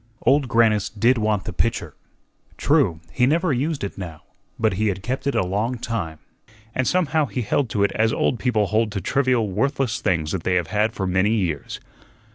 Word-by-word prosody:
Old 135 +2 +3
Grannis 110 -3 +3
did 115 +4 +2
want 105 -3 0
the - - -6
pitcher; - - -1 0.6
true, 80 -1 +2
he 125 - +2
never 165 +2 +2
used 140 +2 -1
it 100 - -5
now, 80 -5 -7 0.3
but 110 -2 +1
he 105 +4 0
had 95 -1 -2
kept 130 +4 -3
it 140 - 0
a 95 - +2
long 105 +7 -1
time, 100 -10 -4 0.6
and 130 - 0
somehow 160 -4 +2
he 120 +3 -3
held 125 +4 0
to 100 -2 0
it 100 - +2
as 110 0 +1
old 125 - 0
people 110 -5 +1
hold 110 +2 +1
to 100 - -2
trivial, 125 +2 +1
worthless 135 +2 0
things 80 -4 0
that 95 - -2
they 90 +2 0
have 90 -2 0
had 105 +1 +2
for 95 - -3
many 95 +2 +2
years. 85 -10 -2
110 Hz, 200 wpm, -22 LUFS, 95-130 Hz, 0.6 s, Old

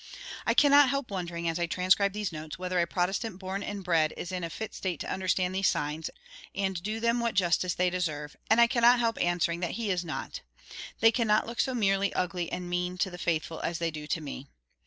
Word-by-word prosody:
I - - +3
cannot 285 -1 +7
help 275 -3 -2
wondering, 170 -3 -3
as 165 +1 -1
I 170 - 0
transcribe 185 +3 +3
these 210 -2 -2
notes, 155 -1 -7
whether 180 0 -1
a 170 - +2
Protestant 190 +3 -1
born 190 +1 -4
and 205 -1 -5
bred 165 -4 +2
is 175 - -5
in 180 -1 -3
a 165 - -3
fit 220 +5 -6
state 180 -5 -3
to - - -3
understand 185 -1 0
these 190 0 +2
signs, 150 +2 -1 0.5
and 190 -3 -1
do 215 +4 -3
them 235 +1 +1
what 235 -1 -1
justice 180 -1 +2
they 180 0 +2
deserve; 150 -5 -3
and 220 - +5
I 235 - +8
cannot 240 0 +5
help 230 -1 0
answering 175 -1 +1
that 175 -2 -2
he 225 -4 -1
is 180 -1 0
not. 165 - -5 0.6
They 225 +1 +7
cannot 220 -3 +2
look 235 +1 -7
so 260 -2 +1
merely 200 -3 +2
ugly 180 -2 -2
and 180 0 -4
mean 180 +1 -2
to 185 +1 0
the 180 - -9
faithful 165 -1 -1
as 170 - -2
they 165 -1 -1
do 150 -1 -7
to 165 - -1
me. 140 -2 -7
180 Hz, 225 wpm, -29 LUFS, 170-210 Hz, 0.6 s, I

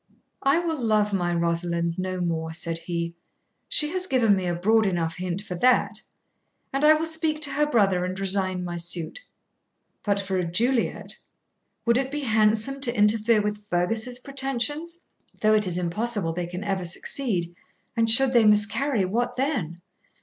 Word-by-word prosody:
'I 275 +3 +3
will 325 -5 -3
love 210 -2 +2
my 175 -2 0
Rosalind 170 0 -1
no 185 0 -3
more,' 160 -2 -2
said 165 -1 -3
he; 170 0 -4 0.6
'she 300 - +3
has 370 0 -1
given 230 - +3
me 185 -2 -2
a 175 - -1
broad 215 +4 +3
enough 165 -3 -2
hint 185 +1 -4
for 185 - -6
that; 250 +9 +2 0.7
and 275 +2 0
I 305 +1 +7
will 315 +1 -1
speak 320 -1 -1
to 285 - +1
her 295 +2 +1
brother 195 -9 +2
and 185 +1 -4
resign 190 -1 -1
my 175 -1 -4
suit. 170 - -3 0.8
But 200 -1 0
for 195 -1 -2
a 180 - 0
Juliet 230 +9 0 0.7
would 235 0 +3
it 265 0 -2
be 295 +1 -4
handsome 220 +2 +1
to 245 -4 -1
interfere 210 +1 +3
with 210 0 -4
Fergus's 220 +8 0
pretensions? 275 +6 -3 0.4
though 215 0 +3
it 210 -2 +3
is 180 -1 0
impossible 180 0 -1
they 175 0 -3
can 180 +3 -6
ever 195 -3 -2
succeed; 175 -1 -2 0.4
and 225 0 +2
should 265 +3 +7
they 230 -3 +5
miscarry, 210 +2 +2
what 240 +6 -1
then? 235 - -2
210 Hz, 170 wpm, -25 LUFS, 175-250 Hz, 0.8 s, I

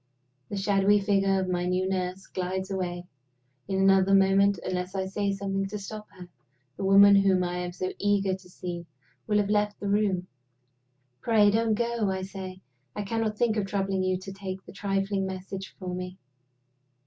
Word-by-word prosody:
The 205 - -4
shadowy 200 +1 +3
figure 195 -1 +2
of 190 - -1
my 180 -1 -1
new 185 +1 0
nurse 185 0 -2
glides 190 +1 -3
away. 180 -2 -3 0.6
In 190 0 -1
another 195 0 +5
moment, 195 +1 +4
unless 180 +1 -3
I 190 -1 -1
say 200 +1 -1
something 195 0 -2
to 210 +2 -5
stop 210 +1 -8
her, 180 -1 -10 0.5
the - - -5
woman 200 +1 +7
whom 190 -2 +3
I 175 0 -2
am 180 0 -3
so 185 +1 -4
eager 200 -2 +2
to 185 -1 -8
see 175 -1 -6 0.4
will 210 -1 +2
have 205 0 +1
left 210 0 +1
the 205 - -4
room. 200 -3 +1 1.0
"Pray 210 -3 +4
don't 225 0 +2
go!" 235 -2 0
I 190 0 -2
say. 190 -1 -7 0.3
"I 210 - -2
cannot 220 0 -2
think 225 -2 +1
of 200 -2 0
troubling 195 -1 -1
you 185 0 +1
to 190 +1 -8
take 190 -1 -6
a - - -9
trifling 195 0 -1
message 190 +1 -7
for 185 -2 -5
me. 180 +1 -5
195 Hz, 180 wpm, -27 LUFS, 185-200 Hz, 1.0 s, woman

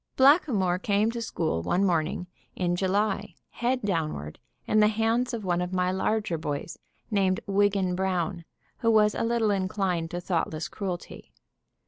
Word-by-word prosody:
Blackamoor 260 - +4
came 205 +3 +1
to 235 0 -4
school 160 - -1
one 180 - +1
morning 170 -1 0 0.3
in 175 -1 0
July, 200 +2 0 0.2
head 250 +1 -1
downward, 155 - -2 0.3
in 215 - +2
the 210 - +6
hands 225 +3 +1
of 225 -4 -4
one 175 -1 +1
of 180 +1 -3
my 180 0 +1
larger 190 -2 0
boys, 145 +1 -4 0.3
named 190 -3 +2
Wiggan 200 -2 +2
Brown, 180 -1 -1 0.4
who 230 - +2
was 215 -1 +5
a - - -3
little 230 -2 +1
inclined 185 -3 -1
to 175 - -4
thoughtless 165 -3 -2
cruelty. 185 -4 -6
190 Hz, 150 wpm, -27 LUFS, 175-215 Hz, 0.4 s, the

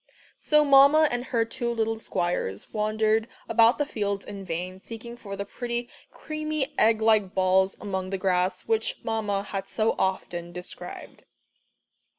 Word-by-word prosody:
So 300 0 +3
Mamma 280 +3 +7
and 245 +1 -2
her 230 -3 +1
two 235 +1 -3
little 225 -1 -1
squires 175 - -3
wandered 215 +1 +1 0.2
about 230 +2 +5
the 290 - +1
fields 200 -7 -2
in 200 -1 -7
vain, 180 +1 -4
seeking 235 +2 -8
for 200 -4 -7
the 200 +1 -4
pretty 240 +2 -4 0.2
creamy 305 -2 -3
egg 220 0 +4
like 215 -4 +3
balls 190 0 +3
among 190 -2 -3
the 195 - -2
grass, 185 0 0
which 470 +3 0
Mamma 210 -3 -1
had 195 -1 -5
so 220 0 +1
often 175 -2 -2
described. 180 +1 -9
220 Hz, 150 wpm, -26 LUFS, 190-240 Hz, 0.2 s, Mamma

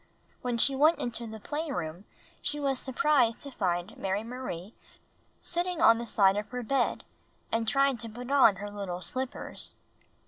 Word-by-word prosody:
When 245 -2 -1
she 270 +4 +3
went 310 +5 +5
into 235 -1 -3
the 220 0 -8
playroom 205 - -4 0.4
she 295 0 -1
was 275 -3 0
sur 265 - -4
prised 250 -4 +3
to 280 - -7
find 180 -3 -1
Mary 195 +2 -1
Marie 230 -5 -6 0.7
sitting 350 0 +1
on 230 -9 +6
the 235 - -5
side 195 -2 +4
of 210 - -3
her 250 -1 -4
bed, 255 +2 0 0.6
trying 275 +1 +3
to 230 0 -4
put 245 +4 -7
on 260 -8 +6
her 205 +2 -6
little 195 -3 -5
slippers. 260 +5 -3
235 Hz, 165 wpm, -29 LUFS, 205-275 Hz, 0.7 s, on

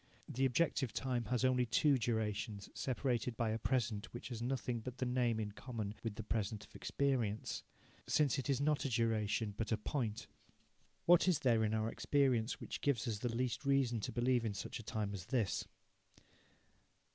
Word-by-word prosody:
The 135 +2 0
objective 130 -3 +1
time 125 -3 -1
has 125 +3 +1
only 125 -1 +3
two 135 +4 +4
durations, 105 -2 -2
separated 125 -3 -1
by 115 -2 +1
a 110 - -1
present 115 -4 0
which 120 - -6
has 120 -2 -5
nothing 125 -1 -1
but 125 +3 -7
the 130 - -1
name 125 -2 +1
in 105 -1 -2
common 110 -2 -5
with 115 -3 -3
the 110 - -5
present 105 0 -2
of - - -22
experience, 125 -7 -1 0.5
since 145 -4 +3
it 135 - -3
is 135 -2 +2
not 150 +1 +2
a 135 - 0
duration 110 -2 +1
but 110 0 -3
a 110 - +3
point. 115 -1 -2 0.8
What 175 +1 +6
is 180 -4 +4
there 115 -4 +4
in 110 0 +1
our 110 +1 0
experience 130 -5 +2
which - - -6
gives 135 -7 +1
us 110 -3 -1
the 120 - -1
least 125 +1 -1
reason 135 -4 +2
to - - -3
believe 120 0 +2
in 110 -3 -2
such - - -5
a - - -8
time 105 -1 -2
as 95 -1 -6
this? 115 - 0
120 Hz, 185 wpm, -37 LUFS, 110-130 Hz, 0.8 s, What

